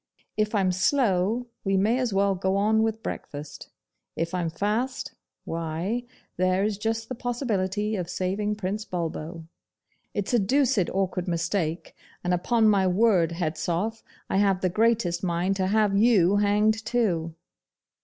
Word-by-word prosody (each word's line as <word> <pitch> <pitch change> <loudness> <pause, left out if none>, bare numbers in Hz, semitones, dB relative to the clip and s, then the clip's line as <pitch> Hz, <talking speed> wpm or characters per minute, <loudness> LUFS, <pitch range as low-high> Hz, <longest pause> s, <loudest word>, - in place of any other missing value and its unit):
If 215 +1 0
I'm 190 -3 +2
slow, 210 +1 +1 0.2
we 195 -1 +1
may 220 +6 +2
as 250 -3 0
well 195 0 +2
go 190 +1 0
on 215 +2 +3
with 225 0 -1
breakfast. 145 +1 -7 0.5
If 165 +1 -2
I'm 175 -2 -1
fast, 215 - -2 0.3
why, 165 +9 -3 0.3
there 185 +1 +2
is 210 -1 -1
just 225 +1 -2
the 255 - -4
possibility 215 -4 -1
of 180 -3 -3
saving 195 +4 -1
Prince 210 +1 -3
Bulbo. 165 -2 -5 0.7
It's 205 +3 -2
a 240 - +5
doosid 220 -3 +2
awkward 185 -1 -1
mistake, 170 -1 -2 0.3
and 180 0 +1
upon 220 +5 +2
my 195 -3 +4
word, 185 -3 +3
Hedzoff, 175 +6 -2 0.3
I - - 0
have 195 -2 +2
the 185 - +2
greatest 210 -4 +1
mind 180 +2 0
to 190 -1 0
have 210 0 +2
you 205 -3 +4
hanged 210 +2 +2
too. 180 -9 0
195 Hz, 145 wpm, -26 LUFS, 180-220 Hz, 0.7 s, a